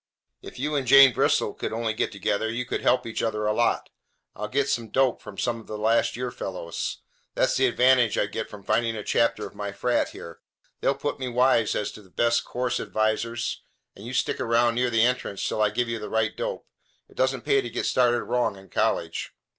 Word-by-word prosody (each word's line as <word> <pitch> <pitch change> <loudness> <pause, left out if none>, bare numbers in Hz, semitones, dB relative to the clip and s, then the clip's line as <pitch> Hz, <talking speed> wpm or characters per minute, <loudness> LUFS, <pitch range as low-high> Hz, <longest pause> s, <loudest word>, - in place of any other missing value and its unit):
If - - -11
you 145 +4 -2
and 135 -3 -1
Jane 135 0 +8
Bristol - - +2
could - - -4
only 115 0 -1
get 110 - -1
together, 100 +2 -1
you 120 +2 -3
could - - -3
help 125 - +2
each 115 - -3
other 105 -1 -1
a 105 - +2
lot. 120 +2 0 0.4
I'll 105 - -4
get 140 +5 0
some 115 -4 -1
dope 130 +1 +1
from 100 - -11
some 120 -1 -1
of 110 - -15
the 105 - -5
last 110 +2 +2
year 125 0 -3
fellows. 90 -6 -5 0.4
That's - - +2
the 130 0 +3
advantage 125 -2 +3
I - - +2
get 110 +2 -5
from 105 -2 -11
finding 115 +3 +1
a 105 - -5
chapter 115 +3 +1
of - - -10
my - - -5
frat - - 0
here. 85 -1 -10 0.4
They'll 140 - +1
put 145 +1 -3
me 130 - -3
wise 125 -2 +2
as 105 - -2
to - - -12
the 95 - -20
best 115 +4 +1
course 125 0 -2
advisers, 110 +2 -1 0.3
and 100 - -12
you 120 +3 -7
stick 120 - 0
around 115 +1 +3
near 125 +1 +1
the 115 -1 +3
entrance 125 -5 0
till 110 - -1
I 105 - +4
give 120 +3 -1
you 115 -1 -3
the 105 - -6
right 110 -1 0
dope. - - -4 0.4
It - - -22
doesn't 130 -1 0
pay 135 - +3
to 120 - -6
get - - -3
started 120 -1 +2
wrong 120 -3 0
in 95 -1 -15
college." - - -1
115 Hz, 225 wpm, -25 LUFS, 110-125 Hz, 0.4 s, Jane